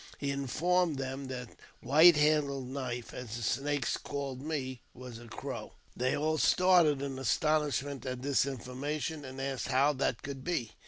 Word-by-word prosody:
He 140 -1 -2
informed 160 +5 +1
them 135 +1 -4
that 125 -2 -6 0.3
White 155 +7 +7
handled 145 -4 +2
Knife 125 -3 -4
{as 120 -3 -6
the 120 - -5
Snakes 145 +5 0
called 135 -2 -5
me) 135 -5 -4
was 125 -2 -9
a 120 - -12
Crow. - - -6 0.2
They 130 +1 0
all 155 +1 0
started 175 -7 +4
in 135 -2 -4
astonishment 145 -1 0
at 125 0 -4
this 140 -1 +2
information, 140 +4 -4
and 130 0 -8
asked 135 -1 -2
how 140 +3 +3
that 130 -3 -1
could 135 -2 -6
be. 160 -11 -2
140 Hz, 160 wpm, -31 LUFS, 130-150 Hz, 0.3 s, White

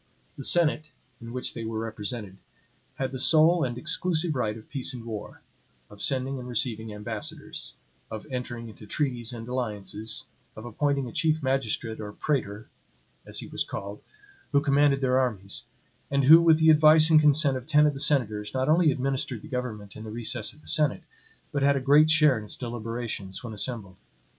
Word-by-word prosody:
The 140 - -8
senate, 155 -1 +2 0.3
in 115 0 -8
which 125 +1 -3
they 115 - -6
were 110 0 -4
represented, 110 -2 -5 0.6
had 130 -1 -3
the 130 - -5
sole 160 +5 +5
and 120 -2 -3
exclusive 165 +4 0
right 110 -5 -2
of 110 - -14
peace 135 -2 -3
and 115 -2 -9
war; 110 -3 -7 0.5
of 100 - -12
sending 135 0 0
and 125 - -8
receiving 115 -2 -1
ambassadors; 105 +1 -5 0.3
of 110 -1 -7
entering 120 -2 -5
into 110 -1 -12
treaties 125 -3 -2
and 115 -1 -8
alliances; 110 -3 -3 0.3
of 110 - -9
appointing 140 +3 -1
a - - -7
chief 155 +2 0
magistrate 120 -4 -1
or 105 -1 -6
praetor, 110 -8 -2 0.6
as - - -2
he - - -8
was - - -1
called, 100 +1 -7 0.5
who 140 - +5
commanded 140 -1 +3
their 130 -1 +2
armies, 100 -7 -2 0.4
and 140 0 +1
who, 160 +5 +9
with 165 -2 +5
the 160 0 +5
advice 155 +1 +6
and 155 -1 +7
consent 150 -2 +4
of 130 0 -6
ten 150 -1 +5
of 150 - +2
the 135 - -7
senators, 110 -7 0
not 130 0 0
only 160 0 +4
administered 135 +1 -2
the - - -9
government 120 -7 -5
in 110 - -9
the 110 - -8
recess 115 0 -2
of 150 - -18
the - - -23
senate, 150 -2 +2 0.5
but 145 - -2
had 140 +1 +4
a - - +1
great 145 +4 +5
share 150 -6 +5
in 105 - -9
its - - -5
deliberations, 115 -5 -5
when 115 -2 -6
assembled. 105 -3 -2
125 Hz, 185 wpm, -26 LUFS, 110-145 Hz, 0.6 s, who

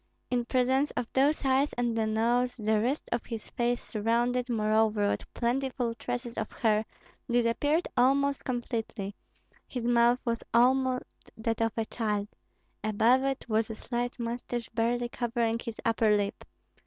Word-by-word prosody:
In 245 -1 +1
presence 260 +3 +2
of 245 - 0
those 280 +2 +2
eyes 270 +2 +2
and 240 -1 0
the 220 -1 +1
nose, 240 +3 +1
the 220 -2 +1
rest 260 +6 -1
of 235 - -2
his 225 -2 -6
face, 240 0 0
surrounded, 240 +3 0
moreover, 215 -2 +2
with - - -4
plentiful 250 0 0
tresses 245 0 -4
of - - -4
hair, 220 -1 +1 0.4
disappeared 245 +7 +2
almost 275 +2 +3
completely; 230 -5 -3 0.5
his 250 -3 -4
mouth 240 0 +4
was 230 -1 -1
almost 255 +1 +4 0.3
that 225 0 -1
of 225 -1 +1
a 225 - 0
child; 210 -3 -2 0.5
above 225 +5 +3
it 270 0 -1
was 220 0 +1
a 220 - -4
slight 240 +2 -3
mustache 235 0 -3
barely 240 +1 0
covering 235 -1 -1
his 230 -1 -6
upper 220 -2 +3
lip. 200 -1 -3
235 Hz, 150 wpm, -29 LUFS, 225-250 Hz, 0.5 s, mouth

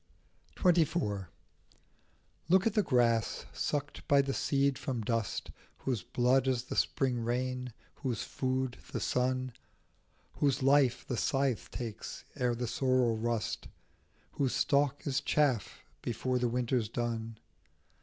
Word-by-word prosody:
27 175 -2 +3
XXIV. 100 - -2 1.2
LOOK 190 +2 +5
at 225 - +2
the 210 - +4
grass, 120 - +2
sucked 145 -1 -3
by 140 - +5
the 135 0 +1
seed 140 0 +2
from 125 -6 -3
dust, 115 -2 -2 0.3
Whose 125 -6 -2
blood 130 +2 +2
is 125 -2 +1
the 130 - -6
spring 130 -3 +1
rain, 125 +2 -2 0.3
whose 130 -6 -2
food 130 -1 -2 0.2
the - - -1
sun, 130 0 0 0.8
Whose 140 -2 +2
life 135 -3 +4
the 125 - -3
scythe 135 +4 0
takes 115 -3 -6
ere 125 -3 +1
the 120 +1 -2
sorrels 130 -3 +2
rust, 115 -1 -2 0.6
Whose 135 -3 0
stalk 140 0 +2
is 135 -3 0
chaff 135 -9 +1 0.2
before 125 +2 -1
the 120 -1 +1
winter's 120 -2 0
done. 115 -1 -3
125 Hz, 130 wpm, -32 LUFS, 120-135 Hz, 1.2 s, LOOK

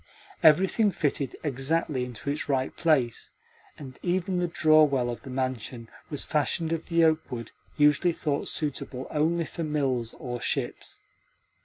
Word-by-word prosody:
Everything 190 +6 +5
fitted 140 -6 -1
exactly 140 0 0
into 125 +3 -4
its 150 0 -4
right 130 -2 0
place, 135 -9 +1 0.5
and 130 -3 -10
even 180 0 0
the 175 - +1
draw 155 -2 +5
well 130 -5 +1
of 120 - -7
the 135 - -10
mansion 125 -2 -4 0.2
was 145 - -3
fashioned 160 +2 0
of 165 -1 -2
the 170 -1 +3
oakwood 155 -8 0 0.3
usually 150 +4 +4
thought 145 -3 -2
suitable 135 -3 -3
only 165 +2 +1
for 165 - -5
mills 135 -6 -1
or 120 -2 -5
ships. 125 0 -3
145 Hz, 145 wpm, -27 LUFS, 130-160 Hz, 0.5 s, Everything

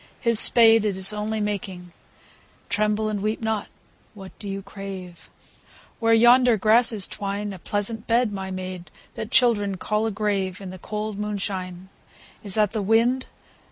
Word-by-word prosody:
His 230 -3 +4
spade, 225 -2 +7
it 205 -3 -1
Is 190 +2 +2
only 215 +1 -3
making, 190 -4 -5 0.4
— - - -32
(Tremble 215 +1 0
and 210 -2 -3
weep 215 +2 -2
not 220 -2 -2
I - - -23 0.5
What 195 -2 -13
do 205 - -7
you 195 0 -5
crave 195 -3 -10 0.4
?) - - -27
Where 230 -1 +1
yonder 240 +1 +5
grasses 220 -1 +3
twine, 200 0 -5
A 190 - -10
pleasant 210 +4 -3
bed, 230 -2 +1
my 190 -1 -5
maid, 185 -1 -7 0.2
that 220 - -6
Children 215 -6 +2
call 215 +4 -1
a - - -2
grave, 195 -3 -2
In 190 -2 -8
the 185 - -10
cold 210 +1 -5
moonshine. 190 -3 -5 0.5
Is 200 -3 +1
that 210 -2 +2
the 220 - -3
wind 230 +5 +1
210 Hz, 170 wpm, -23 LUFS, 195-220 Hz, 0.5 s, spade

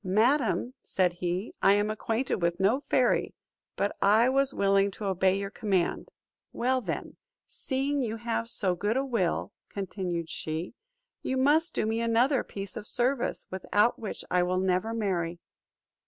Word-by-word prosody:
"Madam," 235 +5 +2
said 180 -2 +1
he, 180 +3 -3
"I 195 - +6
am 205 +1 +1
acquainted 225 +4 -1
with 170 0 0
no 205 +8 +3
fairy; 250 -2 +2 0.4
but 200 - -1
I 220 +5 +5
was 275 +1 +2
willing 195 -1 +3
to 210 - -5
obey 190 0 +2
your 200 0 -4
command." 195 -6 -1 0.4
"Well, 255 +1 0
then, - - -5 0.3
seeing 275 +2 -2
you 225 -3 -2
have 230 0 -2
so 190 -5 0
good 205 +7 -1
a 270 - 0
will," 230 -10 -1 0.2
continued 180 -4 -3
she, 160 +3 -4 0.5
"you 260 - -2
must 310 +5 +3
do - - +1
me 225 +1 0
another 240 +4 +2
piece 195 -1 -7
of 210 - -6
service, 250 +1 0
without 205 +4 +1
which 215 - -6
I 180 0 +3
will 180 +1 0
never 185 +3 +1
marry. 180 -7 -1
210 Hz, 155 wpm, -28 LUFS, 185-245 Hz, 0.5 s, I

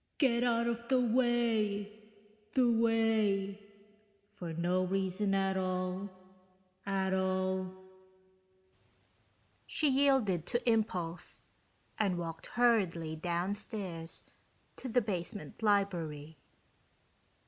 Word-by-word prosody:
(Get 245 -4 +3
out 235 -1 +2
of 235 0 -2
the 260 -1 +4
way, 225 -4 +1 0.6
the 250 -2 +5
way.... 220 -3 +2 0.7
For 175 -5 -6
no 175 +3 +1
reason 195 +1 0
at 195 0 +1
all, 185 +1 -2 0.8
at 190 -1 0
all....) 185 0 0 2.0
She 305 - +1
yielded 260 - +3
to 240 +1 -1
impulse 180 -7 -1 0.6
and 195 -4 +2
walked 165 -1 -5
hurriedly 185 -10 +2
downstairs 175 0 -3 0.5
to 260 - -6
the 245 +2 +3
basement 205 +1 -5
library. 170 -8 0
195 Hz, 90 wpm, -33 LUFS, 180-230 Hz, 2.0 s, the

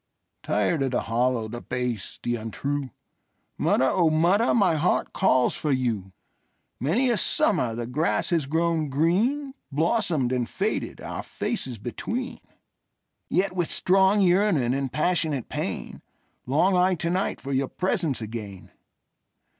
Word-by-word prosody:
Tired 105 +10 0
of 135 - +1
the 125 - 0
hollow, 120 0 0
the 120 +2 -7
base, 125 -5 -4
the 120 - 0
untrue, 135 +5 -3 0.7
Mother, 130 - +2
O 165 +4 +3
mother, 175 +9 +3
my 195 -7 +3
heart 160 +3 0
calls 130 -10 +3
for 150 - -2
you! 115 -8 -1 0.7
Many 225 - +2
a 235 - +2
summer 180 - +2
the 120 0 -4
grass 150 +9 0
has 160 -5 +1
grown 160 0 0
green, 215 - +1 0.2
Blossomed 160 - +1
and 125 -2 -1
faded, 205 +3 -3
our - - -5
faces 130 - -3
between:Yet, 200 - -5
with 175 -3 -1
strong 190 +2 +3
yearning 180 - +3
and 135 -1 -2
passionate 155 -4 0
pain, - - -4 0.5
Long 165 +9 +3
I 180 +1 +3
to 170 0 -2
night 185 +2 -1
for 140 0 -5
your 135 0 +1
presence 175 - -1
again. 105 -4 -8
155 Hz, 135 wpm, -25 LUFS, 125-185 Hz, 0.7 s, O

